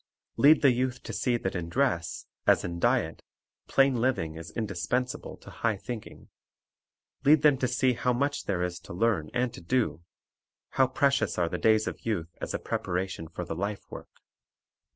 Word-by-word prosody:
Lead 155 +3 +6
the 140 - +7
youth 125 0 -1
to - - -6
see 125 -2 +1
that 95 -4 -3
in 85 -2 -3
dress, 90 -8 0 0.2
as - - +5
in 85 0 -4
diet, - - +1 0.5
plain 135 0 +4
living 115 -10 0
is 80 0 -8
indispensable 110 +6 -3
to - - -13
high 110 -3 -1
thinking. 115 +2 -8 0.9
Lead 150 +1 +5
them 150 -2 +6
to 130 - +1
see 125 +1 +2
how 125 +1 0
much 140 +4 -1
there 90 -3 0
is 90 -1 -3
to - - -10
learn 95 -5 +1
and 125 -1 0
to - - -10
do; 85 - 0 0.7
how 130 - +3
precious 135 -3 +1
are 85 -2 +1
the - - -3
days 110 -1 +4
of - - -5
youth 85 -7 -3
as - - -3
a - - -1
preparation 90 -2 -3
for 90 +2 -6
the 80 - -4
life 100 +3 -3
work. - - -9
115 Hz, 180 wpm, -28 LUFS, 90-130 Hz, 0.9 s, the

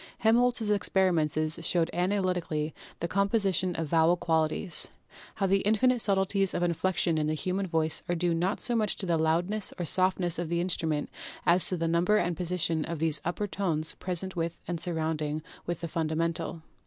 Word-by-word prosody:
Helmholtz's 230 -1 +2
experiments 185 -6 +1 0.3
showed 165 -1 +1
analytically 180 -4 -1 0.3
the 170 - -1
composi 200 +1 +1
tion 180 +1 +1
of 165 - -2
vowel 165 +3 +3
qualities, 160 +2 +1 0.5
how 200 - 0
the 195 +1 +3
infinite 240 +4 +2
subtleties 195 -1 +1
of 175 - 0
inflec 175 +1 0
tion 165 -2 +2
in 150 - 0
the 155 - 0
human 185 +5 -2
voice 160 -2 0
are 175 - +1
due 175 0 0
not 180 +5 0
so 240 - 0
much 215 -3 +1
to 195 - -4
the 170 -3 +1
loud 160 +2 +2
ness 210 -1 -3
or 175 - -3
softness^ 185 -1 +2
of 170 -2 -3
the 170 0 0
instrument 160 -4 0 0.3
as 175 +1 +4
to 185 - +2
the 165 0 -1
number 170 +5 +2
and 175 -3 0
position 170 -2 0
of 170 +1 -4
these 155 -1 +1
upper 175 +5 -2
tones 170 -6 -2
present 185 +1 -3
with 170 0 -3
and 175 -1 -3
sounding 155 -3 -2 0.2
with 175 -1 -3
the 170 - -3
fundamental. 165 +1 -2
175 Hz, 185 wpm, -28 LUFS, 160-190 Hz, 0.5 s, as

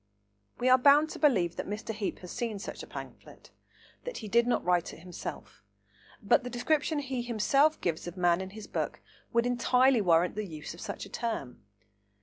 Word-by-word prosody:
We 250 - 0
are 255 0 +7
bound 290 +4 +5
to - - -7
believe 190 - +2
that - - -4
Mr. 210 +2 -4
Heape 210 -2 -3
has 180 - -9
seen 230 -3 -3
such 200 - -7
a - - -9
pamphlet, - - -10 0.5
and - - -36
that - - -5
he 220 - -6
did 235 +3 +3
not 245 - +1
write 175 -1 +1
it - - -15
himself, 175 - -8 0.6
but 200 - +4
the 250 - -5
description 290 +5 0
he 265 -3 -2
himself 275 +6 +2
gives 170 -1 -2
of 175 +2 -7
man 175 0 +3
in 190 - -6
his 215 +2 -9
book - - -3 0.3
would 235 0 +2
entirely 250 0 +3
warrant 175 -2 +3
the 215 - -3
use 155 -3 -7
of 170 - -12
such - - -5
a - - -12
term. 195 - -4
225 Hz, 200 wpm, -30 LUFS, 180-255 Hz, 0.6 s, are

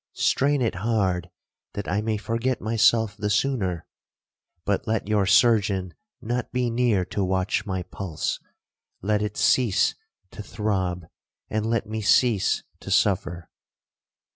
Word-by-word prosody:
—strain 140 -1 +2
it 115 - 0
hard, 95 -4 0 0.4
that 100 - -5
I 100 +3 0
may 110 0 -1
forget 115 +4 -1
myself 110 -1 +2
the 105 0 -2
sooner; 105 -7 0 0.8
but 100 +2 -1
let 110 -2 -1
your 105 -2 +2
surgeon 100 -5 +3 0.3
not 120 +2 -3
be 125 -1 0
near 115 -6 +2
to 100 - -2
watch 95 +3 0
my 95 -2 -2
pulse,—let 100 +3 -5
it 105 -1 -3
cease 120 -7 +3 0.4
to - - -8
throb, 95 -5 -2 0.5
and 110 0 -1
let 115 0 0
me 110 0 -4
cease 105 -1 +3 0.2
to - - -9
suffer.' 85 -4 +1
105 Hz, 130 wpm, -25 LUFS, 95-115 Hz, 0.8 s, surgeon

